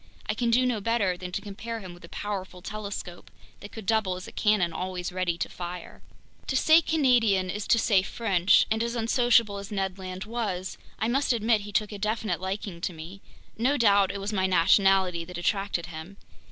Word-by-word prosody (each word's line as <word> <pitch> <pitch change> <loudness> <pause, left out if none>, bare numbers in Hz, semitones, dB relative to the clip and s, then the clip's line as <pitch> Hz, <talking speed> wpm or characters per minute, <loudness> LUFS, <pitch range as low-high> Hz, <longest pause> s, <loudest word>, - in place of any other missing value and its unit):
I 215 - 0
can 235 +2 -1
do 250 +2 +4
no 240 -4 0
better 205 -4 +1
than 180 0 -7
to - - -4
compare 225 +3 -6
him 185 -4 -9
with 175 - -16
a 170 - -11
powerful 190 -3 -5
telescope 200 -4 -7 0.3
that 205 - -10
could 220 -3 -9
double 215 -3 +1
as 185 - -8
a - - -9
cannon 205 -6 +1
always 180 +1 -4
ready 180 -2 -1
to - - -2
fire. 175 0 -8 0.5
To 265 - -1
say 315 +5 +6
Canadian 235 - +2
is 205 +1 -5
to - - +4
say 210 -4 +3
French, 195 -3 +3
and 220 0 +1
as 235 +1 -2
unsociable 230 -2 +2
as 200 +1 -9
Ned 195 -2 -2
Land 185 0 -6
was, 210 -5 -4 0.2
I 220 - -1
must 265 +2 +2
admit 225 -1 +2
he 205 +1 -8
took 210 +1 0
a 205 - -7
definite 210 -3 -1
liking 190 -2 -4
to 180 - -2
me. 170 +5 -10 0.4
No 265 +5 +2
doubt 200 -5 +4
it 200 - -5
was 200 +2 -4
my 190 -2 +1
nationality 185 0 +3
that 180 +1 -8
attracted 195 -1 -1
him. 170 +3 -9
200 Hz, 205 wpm, -27 LUFS, 185-225 Hz, 0.5 s, say